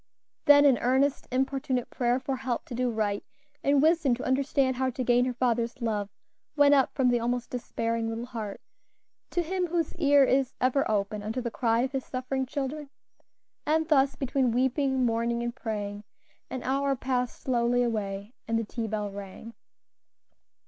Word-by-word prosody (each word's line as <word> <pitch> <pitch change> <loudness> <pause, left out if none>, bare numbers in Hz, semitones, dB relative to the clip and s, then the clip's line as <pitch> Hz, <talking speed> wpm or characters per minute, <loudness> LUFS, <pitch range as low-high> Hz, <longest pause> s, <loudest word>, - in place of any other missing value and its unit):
Then 290 0 +7
an 270 -4 +5
earnest, 265 +3 +1
importunate 265 -1 -1
prayer 245 0 +1
for 265 0 -3
help 255 -2 -3
to - - -8
do 250 +1 0
right, 210 -3 -1 0.4
and 280 0 +3
wisdom 320 -5 +3
to 250 - -7
understand 265 0 +1
how 260 0 +1
to 255 +1 -3
gain 245 0 +3
her 255 - -1
father's 240 0 0
love, 210 -4 -2 0.5
went 290 -1 +6
up 270 -2 +4
from 260 -2 +3
the 240 -1 +2
almost 240 +1 -2
despairing 230 -2 -2
little 225 +1 -4
heart 225 -5 -6 0.7
to 350 - 0
Him 365 +2 -1
whose 335 -2 -1
ear 285 -4 +5
is 265 -1 +1
ever 260 +2 +1
open 205 0 -1
unto 220 +4 -3
the 235 -2 -3
cry 230 -1 +1
of 260 +1 -1
His 270 -2 -2
suffering 260 +1 -3
children. 285 +2 -4 0.7
And 315 +1 +1
thus 275 -2 +4
between 265 -1 0
weeping, 265 +1 +1
mourning, 235 +1 0
and 240 0 -3
praying, 205 -4 -4 0.5
an 260 - -5
hour 275 +1 +1
passed 250 -1 -2
slowly 245 -1 +1
away, 205 -2 -3
and 225 0 +1
the 230 - 0
tea 225 +1 -4
bell 210 -1 -3
rang. 200 +3 -9
250 Hz, 170 wpm, -28 LUFS, 230-270 Hz, 0.7 s, Then